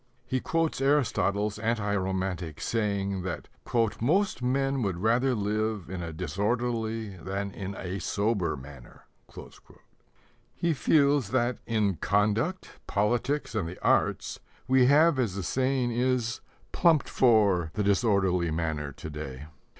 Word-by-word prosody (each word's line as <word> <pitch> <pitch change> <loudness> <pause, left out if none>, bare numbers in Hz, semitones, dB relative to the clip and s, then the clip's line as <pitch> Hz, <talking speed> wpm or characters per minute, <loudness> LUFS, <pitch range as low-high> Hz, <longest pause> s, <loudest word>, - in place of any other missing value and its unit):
He 130 - -1
quotes 165 0 -1
Aristotle's 105 -7 +1
anti 110 -2 0
romantic 95 -4 -2
saying 100 -4 -1
that 90 -3 -5 0.5
"most 185 - +1
men 135 +2 0
would 95 -6 -1
rather 120 +6 +2
live 105 -2 -2
in 90 -2 -4
a 85 -1 -5
disorderly 110 - -2
than 100 +3 -4
in 95 0 -6
a 95 +1 -4
sober 100 -3 0
manner." 65 -2 -13 1.5
He 170 -1 0
feels 140 -5 +3
that 120 +1 0
in 105 -5 +1
conduct, 105 - 0
politics, 120 +8 0
and 105 -7 -1
the 90 - -9
arts, - - +1 0.3
we 130 -1 +5
have, 150 +1 +5
as 110 -7 0
the 100 - -3
saying 130 +5 0
is, 125 0 0 0.3
"plumped 165 -5 +3
for" 100 -9 +3
the 105 - 0
disorderly 100 -4 +2
manner 80 -3 -2
to 75 +2 -9
day. 75 -2 -7
105 Hz, 125 wpm, -28 LUFS, 95-125 Hz, 1.5 s, we